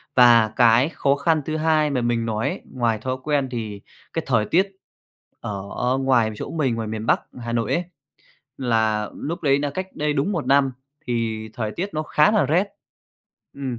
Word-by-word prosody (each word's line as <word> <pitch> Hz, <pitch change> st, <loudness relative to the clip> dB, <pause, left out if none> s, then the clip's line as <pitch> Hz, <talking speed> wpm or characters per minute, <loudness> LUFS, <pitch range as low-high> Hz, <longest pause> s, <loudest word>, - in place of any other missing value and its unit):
Và 120 Hz, -3 st, +7 dB
cái 120 Hz, +4 st, +5 dB
khó 140 Hz, -3 st, +1 dB
khăn 155 Hz, +2 st, +1 dB
thứ 155 Hz, 0 st, -2 dB
hai 155 Hz, -1 st, +2 dB
mà 135 Hz, -3 st, 0 dB
mình 120 Hz, -1 st, 0 dB
nói 110 Hz, -1 st, -1 dB
ấy, -, -, -5 dB
ngoài 120 Hz, -3 st, +1 dB
thói 130 Hz, +3 st, -3 dB
quen 145 Hz, -2 st, +1 dB
thì 110 Hz, -4 st, -5 dB, 0.3 s
cái -, -, -2 dB
thời 105 Hz, -, +2 dB
tiết 185 Hz, -, +2 dB, 0.7 s
ở 100 Hz, -2 st, -5 dB, 0.3 s
ngoài 125 Hz, -5 st, +2 dB
chỗ -, -, -6 dB
mình, 140 Hz, -7 st, 0 dB
ngoài 115 Hz, -1 st, -3 dB
miền 110 Hz, 0 st, -4 dB
Bắc -, -, +3 dB, 0.2 s
Hà 115 Hz, 0 st, -4 dB
Nội 115 Hz, -2 st, 0 dB
ấy, 175 Hz, -, +1 dB, 0.8 s
là 110 Hz, -4 st, +1 dB, 0.2 s
núc 170 Hz, -, -4 dB
đấy 140 Hz, -2 st, +3 dB
là 145 Hz, 0 st, -1 dB
cách 185 Hz, +6 st, -4 dB
đây 150 Hz, 0 st, 0 dB
đúng 145 Hz, +8 st, 0 dB
1 165 Hz, -6 st, -2 dB
năm 140 Hz, -1 st, +3 dB, 0.3 s
thì 115 Hz, -2 st, -2 dB
thời 110 Hz, -2 st, -3 dB
tiết 195 Hz, +4 st, -3 dB
nó 155 Hz, -, -1 dB
khá 150 Hz, 0 st, +3 dB
là 210 Hz, -9 st, +3 dB
rét. 170 Hz, +8 st, +2 dB, 0.9 s
Ừm, 130 Hz, -4 st, -5 dB
130 Hz, 190 wpm, -23 LUFS, 115-150 Hz, 0.9 s, Và